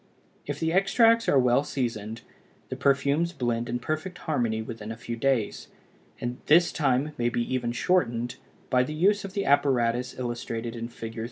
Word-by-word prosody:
If 145 0 -3
the 160 0 0
extracts 230 +4 +4
are 140 - +4
well 125 +1 +4
seasoned, 115 -5 -3 0.5
the - - -3
perfumes 140 +5 +1
blend 120 -5 -1
in 120 - -1
perfect 155 +7 -4
harmony 120 -10 -1
within 110 -1 -6
a 110 - -6
few 115 0 -5
days, 120 -3 0 0.5
and 120 +1 -4
this 170 +3 +5
time 140 -1 +1
may 120 0 +2
be 120 0 -1
even 120 -2 0
shortened 120 -4 0 0.3
by 125 -1 +4
the 150 +4 -2
use 200 +6 +3
of 195 -1 -7
the 200 -1 -1
apparatus 125 -3 +2
illustrated 120 -1 -4
in 115 0 -4
Fig. 115 -1 -8
125 Hz, 170 wpm, -27 LUFS, 120-155 Hz, 0.5 s, this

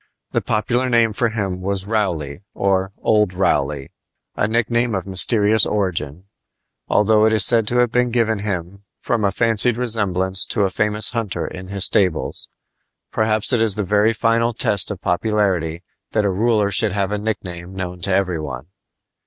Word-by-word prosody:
The - - 0
popular 120 +4 -1
name 115 -2 +2
for 115 +2 0
him 100 -4 -4
was 95 0 -2
"Rowley," 90 -8 -2
or 95 -1 0
"Old 105 -4 +2
Rowley" 70 -6 -1 0.4
a 105 - 0
nickname 115 0 0
of 95 - -3
mysterious 105 +3 +3
origin, 90 -6 -2 0.7
though 105 +1 +3
it 110 - +3
is 105 -3 +4
said 115 -3 +4
to 120 - +1
have 125 -2 +2
been 125 +1 +1
given 115 -3 0
him 100 -2 -5 0.2
from 115 -3 -2
a 100 - +2
fancied 115 +1 +2
resemblance 95 -6 +1
to 105 - 0
a 95 - 0
famous 105 +2 +1
hunter 105 -8 -3
in 95 0 -8
his 100 -1 +1
stables. 90 -5 0 0.6
Perhaps 110 +1 0
it 120 - +2
is 110 -4 +2
the 105 - -2
very 105 +3 +2
final 115 +1 0
test 105 -5 +1
of 100 -4 -5
popularity 90 -4 -1 0.3
that 105 - +1
a 100 - +1
ruler 105 +1 +1
should 105 -1 +1
have 100 -1 -1
a 105 - -2
nickname 95 -4 -5
known 90 -1 -5
to 95 - -1
every 95 -3 0
one. 70 0 -7
105 Hz, 170 wpm, -19 LUFS, 95-110 Hz, 0.7 s, is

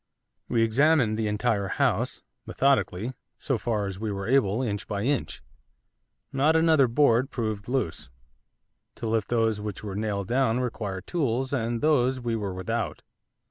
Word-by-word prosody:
We 115 -1 +2
examined 125 0 +3
the 110 0 -1
entire 105 -1 0
house, - - 0 0.2
methodically, 110 -4 +1 0.3
so 135 -5 -1
far 105 -1 -1
as 95 -1 -5
we 110 -1 -2
were 100 -1 -4
able, 120 -3 +2
inch 105 -4 -3
by 100 0 -2
inch. 140 +1 -1 0.9
Not 145 +4 +3
another 160 -4 +5
board 125 0 +3
proved 110 -6 -3
loose, 125 - -2 0.9
to - - -6
lift 110 -2 0
those 115 -3 +1
which 105 -2 -6
were 100 -2 -5
nailed 100 -1 -2
down 125 0 +2
required 105 -6 -4
tools, 135 -5 -1
and 115 -3 -1
those 130 -4 +2
we 120 -2 -2
were 100 -4 -3
without. 95 -1 -3
115 Hz, 150 wpm, -26 LUFS, 105-130 Hz, 0.9 s, another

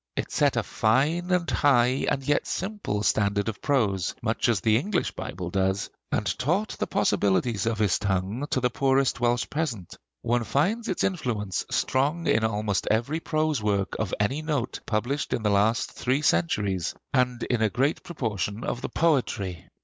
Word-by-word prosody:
It - - -3
set - - +2
a - - +2
fine 150 +11 +1
and 180 -2 +1
high 130 -2 +3
and 135 - -1
yet 145 +2 +1
simple 190 - -3
standard 100 +1 +1
of 110 -3 -4
prose, 100 -11 +1
much 115 +1 +1
as 115 -4 +2
the 110 +3 +3
English 185 - -1
Bible 90 -1 -6
does; 95 +1 0 0.2
and 105 - 0
taught 175 +11 +1
the - - -3
possibilities 100 +2 +1
of 115 -1 0
his 105 -3 +2
tongue 100 +7 -1
to - - +1
the 125 -1 +1
poorest 135 -1 +2
Welsh 120 0 +1
peasant. 130 - -3 0.3
One 120 0 +1
finds 200 - 0
its 185 - -1
influence 115 - -2
strong 145 +6 0
in 110 -7 +2
almost 105 -2 0
every 120 +9 +1
prose 155 -5 0
work 100 -2 0
of 110 -4 -1
any 130 +9 0
note 145 -6 -2
published 120 +7 -1
in 115 - -1
the 105 - +2
last 105 +3 +2
three 135 +4 -1
centuries, 95 - +1 0.2
and 125 -1 +1
in 120 -3 0
a 110 - +3
great 135 +7 0
proportion 110 - -3
of 120 - -3
the - - -4
poetry. 105 - 0
120 Hz, 170 wpm, -26 LUFS, 105-145 Hz, 0.3 s, high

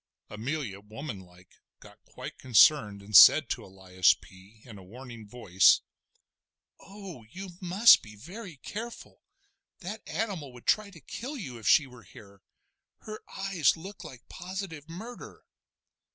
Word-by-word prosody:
Amelia, 115 -1 -4
womanlike, 100 -5 -11 0.2
got - - -17
quite - - -10
concerned, 115 -4 +4
and 105 +1 -5
said - - +9
to - - -3
Elias 95 -2 +1
P. 95 +4 -19
in 110 -5 -12
a - - -13
warning 115 +2 -12
voice: 100 -5 +3 1.0
"Oh! 195 - -11
you 190 +7 -9
must 190 +6 +6
be 105 -2 -13
very 175 - -10
careful. 230 - -9 0.6
That 200 +4 -7
animal 185 - -4
would 120 - -15
try 215 -1 +1
to 180 -4 -15
kill 270 - -7
you 130 - -8
if 110 - -7
she 150 - +5
were 125 -2 -15
here; 100 0 -17 0.6
her 215 0 -9
eyes 195 -5 0
look 190 +5 -10
like 125 -3 -12
positive 175 -4 -8
murder." 220 +9 -10
135 Hz, 135 wpm, -28 LUFS, -, 1.0 s, said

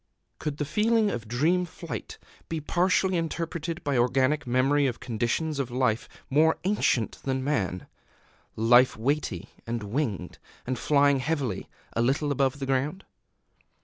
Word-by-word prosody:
Could 150 -2 -3
the 150 - -1
feeling 215 +4 +2
of 115 - -5
dream 155 +10 +2
flight 175 - -7 0.3
be 165 - -2
partly 185 +4 +2
interpreted 165 0 -3
by 140 -4 +1
organic 130 +4 +2
memory 135 +3 +3
of 125 - -3
conditions 125 +6 -1
of 135 -3 -1
life 125 -2 0 0.2
more 155 +4 +3
ancient 180 - +1
than 130 -1 -1
man, 100 -11 -1 0.7
life 120 +3 +5
weighty, 120 - -1 0.2
and 115 -1 -2
winged, 105 -5 -3 0.3
and 130 -1 -2
flying 140 -2 +3
heavily, 130 - -2 0.3
_a 115 - +2
little 145 +4 +1
above 135 0 +1
the 140 - -4
ground? 135 +8 -1
140 Hz, 140 wpm, -27 LUFS, 120-160 Hz, 0.7 s, life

